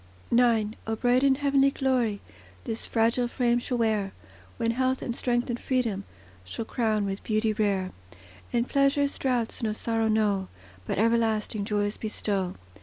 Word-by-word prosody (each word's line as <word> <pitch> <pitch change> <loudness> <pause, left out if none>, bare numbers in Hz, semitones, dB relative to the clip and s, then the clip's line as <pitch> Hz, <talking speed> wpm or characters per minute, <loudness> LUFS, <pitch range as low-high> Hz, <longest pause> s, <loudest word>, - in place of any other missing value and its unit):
IX 230 -3 +3 0.2
O 225 - 0
bright 245 +2 +2
the 275 -1 +4
heavenly 275 -1 +3
glory, 250 -7 0 0.4
This 225 - -4
fragile 235 +2 +2
frame 240 -1 +1
shall 245 +1 -2
wear, 215 -4 0 0.4
When 230 - +1
health, 260 +2 0
and 235 - -3
strength, 240 -1 0
and 240 - -3
freedom 230 -7 -1 0.4
Shall 95 - -5
crown 220 -4 0
with 195 0 -4
beauty 215 0 +1
rare; 200 -3 0 0.6
And 240 +1 +1
pleasure's 280 0 +2
draughts 245 -4 0
no 220 -2 0
sorrow 225 0 0
know, 210 -3 +1 0.4
But - - -1
everlasting 220 -1 +1
joys 205 0 -1
bestow. 200 -4 -2
230 Hz, 150 wpm, -27 LUFS, 215-245 Hz, 0.6 s, the